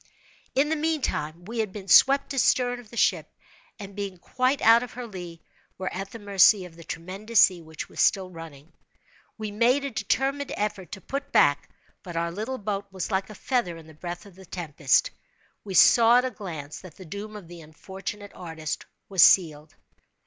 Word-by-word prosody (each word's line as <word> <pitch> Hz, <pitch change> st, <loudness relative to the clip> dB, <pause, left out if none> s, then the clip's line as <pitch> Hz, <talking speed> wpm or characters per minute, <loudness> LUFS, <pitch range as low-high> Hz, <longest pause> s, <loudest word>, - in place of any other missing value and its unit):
In 285 Hz, +3 st, +3 dB
the 320 Hz, -, +1 dB
meantime, 260 Hz, -, -2 dB
we 230 Hz, +3 st, -5 dB
had 215 Hz, -3 st, -1 dB
been 195 Hz, -1 st, -9 dB
swept 275 Hz, +8 st, +5 dB
astern 245 Hz, -1 st, +2 dB
of 235 Hz, -3 st, -15 dB
the 235 Hz, -, -11 dB
ship, -, -, +1 dB, 0.5 s
and 200 Hz, -3 st, -10 dB
being 200 Hz, -3 st, -5 dB
quite 255 Hz, +9 st, 0 dB
out 230 Hz, +1 st, +7 dB
of 250 Hz, -, -7 dB
her 250 Hz, 0 st, -6 dB
lee, 175 Hz, -6 st, -9 dB, 0.3 s
were 185 Hz, 0 st, -4 dB
at 195 Hz, +1 st, -5 dB
the 230 Hz, -, -9 dB
mercy 200 Hz, -1 st, +4 dB
of 170 Hz, -2 st, -13 dB
the 165 Hz, -, -12 dB
tremendous 195 Hz, +8 st, 0 dB
sea 180 Hz, -3 st, +4 dB
which 160 Hz, -1 st, -8 dB
was -, -, -4 dB
still 190 Hz, -2 st, +2 dB
running. 165 Hz, -2 st, -12 dB, 0.6 s
We 215 Hz, -2 st, -5 dB
made 245 Hz, +6 st, +2 dB
a 280 Hz, -, -3 dB
determined 270 Hz, +6 st, -1 dB
effort 205 Hz, -3 st, -3 dB
to 190 Hz, -, -7 dB
put 280 Hz, +5 st, -5 dB
back, 145 Hz, 0 st, +3 dB, 0.3 s
but 175 Hz, -2 st, -9 dB
our 170 Hz, 0 st, -1 dB
little 220 Hz, +8 st, -4 dB
boat 205 Hz, -2 st, -4 dB
was 190 Hz, +2 st, -5 dB
like 190 Hz, +1 st, -1 dB
a 215 Hz, -, -10 dB
feather 215 Hz, -8 st, -1 dB
in 165 Hz, -, -13 dB
the 160 Hz, -, -15 dB
breath 175 Hz, +4 st, -7 dB
of 200 Hz, -, -14 dB
the 190 Hz, +1 st, -15 dB
tempest. 155 Hz, -6 st, +1 dB, 0.5 s
We 195 Hz, -2 st, -6 dB
saw 235 Hz, +4 st, +7 dB
at 250 Hz, -, +2 dB
a 255 Hz, -, -2 dB
glance 160 Hz, -9 st, -7 dB
that 185 Hz, -5 st, -13 dB
the 185 Hz, -, -12 dB
doom 205 Hz, +6 st, -7 dB
of 200 Hz, -5 st, -10 dB
the 170 Hz, 0 st, -11 dB
unfortunate 190 Hz, +6 st, -8 dB
artist 160 Hz, -3 st, -6 dB, 0.2 s
was 190 Hz, -3 st, +2 dB
sealed. 155 Hz, -4 st, +4 dB
195 Hz, 195 wpm, -26 LUFS, 170-230 Hz, 0.6 s, out